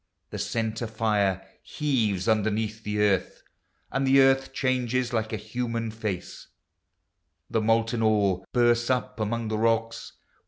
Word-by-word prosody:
The - - -5
centre 115 0 -2
fire 105 -4 0
heaves 115 - -1
underneath 110 0 0
the 105 0 -2
earth, 100 -3 0 0.5
And 135 0 0
the 135 +1 +6
earth 135 0 +4
changes 130 -2 0
like 110 -1 -1
a 110 - -2
human 115 0 -3
face; 105 -5 -5 1.0
The 110 - +1
molten 115 +1 +1
ore 100 -4 +2
bursts 120 -1 +2
up 125 -3 -1
among 110 +1 -2
the 110 0 -1
rocks. 115 0 0
110 Hz, 130 wpm, -26 LUFS, 105-120 Hz, 1.0 s, the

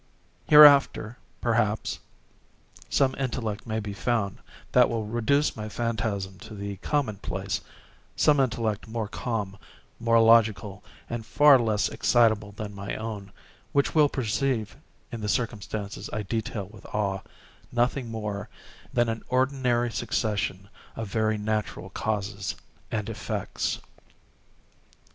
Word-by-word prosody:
Hereafter, 140 -6 +7 0.2
perhaps, 110 -3 0 0.9
some 135 -1 +3
intellect 120 -5 -3
may 110 0 -1
be 105 -1 -5
found 100 -2 -1 0.3
which 125 -1 +6
will 115 -2 -2
reduce 120 +7 +1
my 110 0 -5
phantasm 105 -4 -2
to 110 - -10
the 100 -1 -5
common 125 -1 -1
place—some 145 +8 -2
intellect 115 -5 0
more 110 -1 -3
calm, 105 -3 -3 0.4
more 115 0 +4
logical, 110 -3 +4 0.2
and 120 -1 -4
far 145 +4 +6
less 110 -3 +1
excitable 110 -4 +2
than 105 0 -6
my 100 0 -5
own, 105 -3 -6 0.4
which 140 - +2
will 150 -2 +5
perceive, 125 -2 -1 0.4
in 115 -2 -5
the 105 - -2
circumstances 105 -2 -3
I 105 - -2
detail 110 0 -3
with 105 0 -14
awe, 100 -2 -1 0.5
nothing 120 +1 0
more 105 -2 -4 0.4
than 120 -1 +2
an 115 0 -2
ordinary 125 -2 +1
succession 100 -4 -1 0.3
of 115 -3 -5
very 110 0 +1
natural 105 0 -3
causes 100 -2 -2 0.3
and 110 -2 -2
effects. 115 - -3
110 Hz, 120 wpm, -27 LUFS, 105-120 Hz, 0.9 s, Hereafter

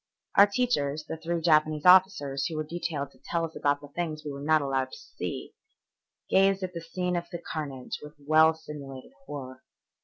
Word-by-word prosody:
Our 200 - +8
teachers, 180 - 0
the - - -4
three 165 +1 -3
Japanese 155 -2 +3
officers 180 -7 +5
who 165 - -5
were 155 - -1
detailed 150 -3 -4
to - - -23
tell 170 -1 -1
us 160 - -10
about 145 0 +1
things 155 -3 -3
we 145 - -3
were 140 0 -7
not 155 0 +3
allowed 135 -1 -1
to - - -7
see, - - -6 0.7
gazed 195 0 +3
at 180 -1 -4
the 170 - -5
scene 180 +2 -2
of 175 0 -2 0.3
carnage 140 -5 -5
with 150 0 -11
well 155 +2 +4
simulated 140 - -9 0.2
horror. 130 -3 -7
155 Hz, 180 wpm, -28 LUFS, 145-175 Hz, 0.7 s, Our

